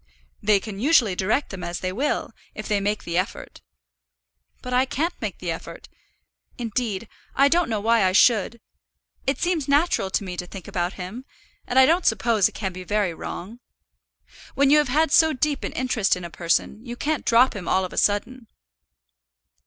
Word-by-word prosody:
"They 210 -2 +3
can 200 -1 -8
usually 245 - +4
direct 215 +10 0
them 190 -2 -7
as 175 0 -4
they 185 - -3
will, 275 +9 -1 0.2
if - - -6
they 210 -2 +1
make 205 +2 -2
the 170 +1 -1
effort." 185 - -6 1.0
"But 250 - -5
I 250 +1 +4
can't 310 +6 -2
make - - -4
the - - -4
effort. - - -8 0.7
Indeed, 230 -3 -3 0.3
I 275 - +5
don't 335 +1 +2
know 220 -2 -1
why 225 +1 +3
I 185 - +3
should. 220 +2 +3 0.7
It 270 - +1
seems 345 -5 0
natural 285 - +2
to 195 - -1
me 180 -2 -6
to 180 - -5
think 190 -1 -10
about 180 -2 -2
him, 190 +8 -7 0.4
and 245 - -1
I 265 - +8
don't 335 +5 +2
suppose 225 -2 +2
it - - -21
can 190 -3 -3
be 185 0 -8
very 205 -2 0
wrong. 205 +7 -7 1.0
When 280 0 +3
you 300 - +7
have 295 - +1
had 305 +3 +2
so 320 0 +5
deep 285 +2 -1
an - - -3
interest 250 -5 +1
in 180 - -8
a 170 - -8
person, 175 +6 -1
you 240 -1 -7
can't 300 +3 -2
drop 240 +2 +4
him 185 -4 -6
all 190 0 +2
of 180 - -8
a - - -9
sudden." 230 +4 0
225 Hz, 190 wpm, -23 LUFS, 190-265 Hz, 1.0 s, I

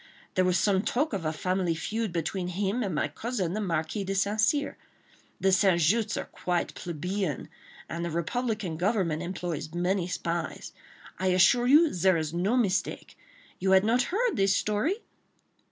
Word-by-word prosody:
There 185 - +3
was 180 0 +3
some 190 +1 +2
talk 265 +6 0
of 190 -5 -3
a 155 - +1
family 180 +1 -1
feud 220 +5 -2
between 175 +2 -2
him 195 +6 -1
and 195 -8 -2
my - - +1
cousin, 220 -8 -3
the 215 - -2
Marquis 165 +1 -1
de 195 +1 -3
St. 205 +2 +1
Cyr. 285 +6 +1 0.6
The 190 - +3
St. 190 -2 +4
Justs' 205 +8 +2
are - - -3
quite 175 -1 -2
plebeian, 175 -1 -3 0.4
and 170 0 -4
the 170 - -2
republican 195 +1 -2
government 180 -4 0
employs 175 -3 -4
many 180 +1 0
spies. 170 -3 -4 0.5
I 190 - 0
assure 190 +7 +4
you 300 +4 +6
there 185 0 +3
is 155 -1 -3
no 195 +8 +1
mistake.... 200 -6 -1 0.4
You 190 +1 +2
had 190 0 +6
not 235 +3 +3
heard 460 +5 0
this 195 0 +3
story?" 260 - 0
190 Hz, 170 wpm, -28 LUFS, 170-215 Hz, 0.6 s, you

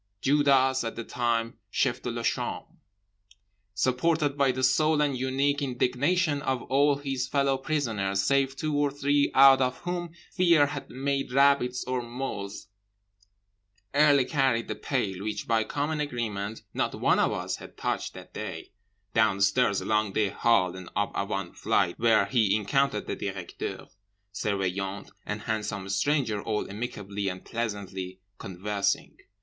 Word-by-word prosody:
Judas 135 -2 +3
(at 115 - -4
the 115 - -5
time 115 -1 -1
chef - - 0
de - - -4
chambre) - - -1 1.1
supported 140 - +1
by 140 -2 +3
the 130 +1 -4
sole 155 +4 +3
and 145 -2 +1
unique 135 +3 0
indignation 140 +5 +1
of 130 -3 -1
all 140 +2 +3
his 135 -3 -3
fellow 140 -1 +2
prisoners 115 -9 -1
save 135 +4 +2
two 155 +1 -2
or 145 0 +2
three 145 +1 +1
out 135 0 +8
of 125 0 0
whom 175 -1 -4 0.2
Fear 170 -6 +5
had 145 - -6
made 135 0 -2
rabbits 135 -2 +3
or 125 -1 -2
moles, 120 -5 -5 1.3
early 145 -2 +5
carried 130 -5 +1
the - - -2
pail 100 -9 -2
(which 105 -1 -4
by 115 -1 +2
common 145 +7 -2
agreement 110 -7 -3
not - - -1
one - - +2
of - - +3
us - - -3
had - - -13
touched - - -2
that - - -11
day) - - -6 0.4
downstairs, 100 0 +3
along 105 +1 0
the 105 -1 +1
hall, 100 -4 +2
and 95 -2 -9
up 105 0 0 0.2
one 100 -4 -3
flight—where 110 +5 +2
he 110 -6 +2
encountered 110 +2 +1
the - - -3
Directeur, 95 -3 -5 0.5
Surveillant 95 -1 -2 0.2
and 105 +1 -3
Handsome 105 -3 -3
Stranger 110 +1 +1
all 105 -1 -2
amicably 100 -2 -4
and 90 -1 -5
pleasantly 95 -5 -4 0.2
conversing. 100 +2 -2
125 Hz, 140 wpm, -27 LUFS, 105-140 Hz, 1.3 s, out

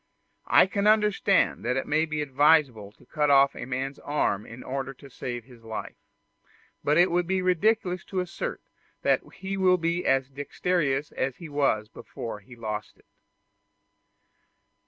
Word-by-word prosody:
I - - +6
can 200 +2 -1
understand 210 -2 +3
that 125 - 0
it 135 - -1
may 155 +2 +2
be 155 -1 -2
advisable 140 -7 +3
to - - -22
cut 150 -2 0
off 140 0 +5
a - - -6
man's 135 +2 -3
arm 125 -8 -1
in 115 +2 -10
order 135 0 -4
to 140 +1 -15
save 120 -1 -5
his 125 -3 -17
life; 110 -1 -6 0.9
but 150 +2 +2
it 175 +1 +5
would 175 0 +1
be 190 0 0
ridiculous 185 0 +1
to 190 - -3
assert 185 - -4 0.4
that - - +3
he 195 0 -4
will 185 -1 +4
be 170 +1 -1
as 135 0 +2
dexterous 145 0 -1
as 130 -1 -2
he 170 -3 -10
was 140 -7 +1
before 110 0 -8
he 115 +5 -15
lost 105 -2 -5
it. - - -27
145 Hz, 160 wpm, -27 LUFS, 130-180 Hz, 0.9 s, I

